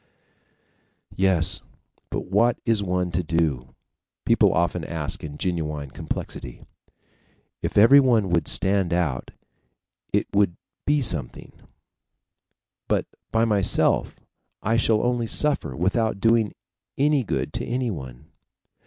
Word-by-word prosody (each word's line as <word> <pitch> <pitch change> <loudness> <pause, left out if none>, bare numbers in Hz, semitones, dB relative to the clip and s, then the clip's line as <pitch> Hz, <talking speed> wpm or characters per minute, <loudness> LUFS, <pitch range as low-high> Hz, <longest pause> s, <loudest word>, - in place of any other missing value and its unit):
"Yes, 95 -4 +2 0.5
but - - -3
what 115 +6 +2
is 115 -3 +2
one 90 -2 -1
to 85 +2 0
do?" 80 -7 -1 0.5
people - - +4
often 85 0 0
ask 80 -3 -4
in 75 -1 -7
genuine 75 -6 -3
perplexity. - - -6 1.0
"If - - -3
everyone 115 -3 +6
would 85 -1 +1
stand 95 -2 +2
out 80 -8 -1 0.8
it - - +1
would 100 -4 +2 0.3
be 145 -1 +2
something, 75 - -2 1.4
but - - +1 0.3
by 115 +1 +2
myself, 105 -4 +2 0.4
I 115 +2 +1
shall 110 -1 +2
only 120 -1 0
suffer 145 - -1
without 100 - 0
doing 115 -1 +2 0.4
any 145 -1 +2
good - - -3
to - - -3
anyone." 90 - -4
95 Hz, 110 wpm, -24 LUFS, 80-115 Hz, 1.4 s, everyone